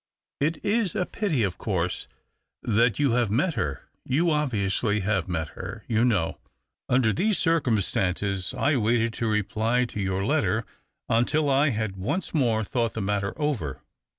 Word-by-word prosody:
It 155 +4 +1
is 210 -3 +1
a 180 - +1
pity, 175 - -1
of 95 -3 -2
course, 90 -4 -2 0.6
that 115 +1 +2
you 145 -3 +2
have 120 -2 +2
met 140 - +1
her 70 - -3
— - - -48
you 165 +6 +1
obviously 105 -7 0
have 95 -2 0
met 80 -4 -2
her, - - -8
you 110 0 +2
know. 100 -10 +1 0.5
Under 125 -4 +3
these 205 +3 +1
circumstances 100 - 0
I 145 0 +2
waited 115 0 +1
to 115 - -2
reply 110 +3 +1
to 110 - -7
your 95 0 -1
letter - - +1 0.4
until 140 +6 +2
I 140 +2 +4
had 110 -5 -2
once 145 - -2
more 115 -8 +2
thought 115 +1 -1
the 110 - -2
matter 100 +4 -2
over. 125 - -2
115 Hz, 160 wpm, -26 LUFS, 100-140 Hz, 0.6 s, I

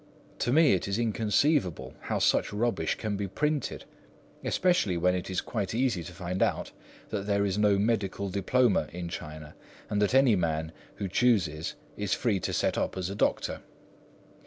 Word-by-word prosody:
To 120 - 0
me 155 -1 +5
it 95 - 0
is 100 +1 -1
inconceivable 110 - +1
how - - -2
such - - +2
rubbish 115 +3 0
can 105 -2 -3
be 100 0 -2
printed, 150 +6 -2 0.6
especially 175 - +2
when 90 +2 +2
it 90 0 -3
is 95 - -1
quite 105 -3 -3
easy 120 -8 +1
to 80 - -8
find 90 +1 -4
out - - 0 0.4
that 100 -1 -3
there 100 0 +2
is 95 -2 0
no 105 -1 +4
medical 100 -2 0
diploma 100 -1 +2
in 85 +1 -5
China, 75 -2 -8 0.4
and 105 0 +1
that 105 +5 +2
any 135 -5 +6
man 80 -3 -1 0.2
who 100 - -3
chooses 90 -8 +1 0.2
is 105 -2 0
free 110 -6 0
to - - -3
set - - 0
up - - -2
as 95 0 -2
a - - -5
doctor. - - 0
100 Hz, 175 wpm, -28 LUFS, 90-115 Hz, 0.6 s, any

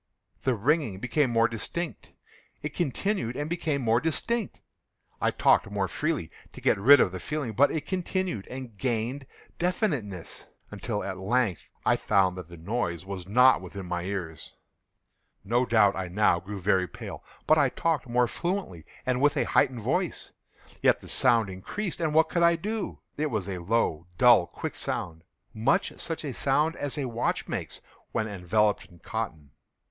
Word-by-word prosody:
The 130 -2 +1
ringing 135 - +1
became 125 +4 +1
more 115 0 +4
distinct:—it 150 +4 -6
continued 165 - -1
and 145 +2 -3
became 155 -5 -1
more 115 +1 +3
distinct: 220 +7 -1 0.6
I - - +3
talked - - +3
more 100 -1 -1
freely 150 - -2 0.2
to - - -10
get - - +2
rid 140 +8 +8
of 90 - +3
the 95 - -5
feeling: 150 -2 -3
but 140 +7 +5
it 155 -2 -3
continued 185 - -2
and 130 -4 -8
gained 125 +2 -2 0.3
definiteness—until, 115 - -3
at 95 -1 -5
length, 105 -2 0 0.2
I - - +4
found 95 -3 +2
that 90 -3 -8
the 85 - -11
noise 85 -1 -2
was 95 -2 -6
not 125 +4 +5
within 95 +1 -7
my 90 0 -2
ears. 90 -4 -5 0.9
No 120 +5 +1
doubt 105 -4 +4
I 95 -1 -3
now 90 -1 +3
grew 100 +3 -7
very 95 -1 +2
pale;—but - - -2
I - - +4
talked 160 -6 -1
more 125 0 +3
fluently, 170 - -3 0.2
and 130 0 0
with 145 0 +3
a - - +3
heightened 125 -3 +2
voice. - - -1 0.5
Yet - - +4
the - - -12
sound 115 -5 +3
increased—and 155 - -3
what 160 0 +5
could 170 - 0
I 170 0 +5
do? 210 +5 -4 0.2
It 150 +1 0
was 110 -6 -2
a 95 -2 -4
low, 85 -4 0
dull, 120 -8 +6
quick - - -5
sound—much 85 +7 -2
such 165 -1 -3
a 140 - -3
sound 150 +6 +1
as 145 +1 -3
a 140 - -1
watch 120 -1 -1
makes - - -5 0.3
when 110 - -1
enveloped 105 +1 +1
in 85 - -18
cotton. 80 -7 -5
115 Hz, 160 wpm, -27 LUFS, 95-150 Hz, 0.9 s, rid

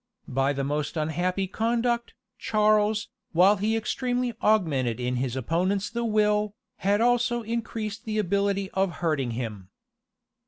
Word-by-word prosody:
By 135 +2 +1
the 140 -1 -2
most 150 +4 -2
unhappy 175 +5 0
conduct, 235 +4 -1 0.2
Charles, 215 0 +2 0.2
while 190 +5 +5
he 215 +3 +1
extremely 245 +2 -1
augmented 145 - +2
in 125 0 -1
his 125 -1 -2
opponents 180 - 0
the 235 0 -2
will, 210 -1 +2 0.2
had 200 +2 +1
also 240 0 +2
increased 225 -1 -4
the 215 -1 -2
ability 200 0 0
of 190 -2 0
hurting 155 -8 -1
him. 105 -7 -5
200 Hz, 130 wpm, -26 LUFS, 155-220 Hz, 0.2 s, while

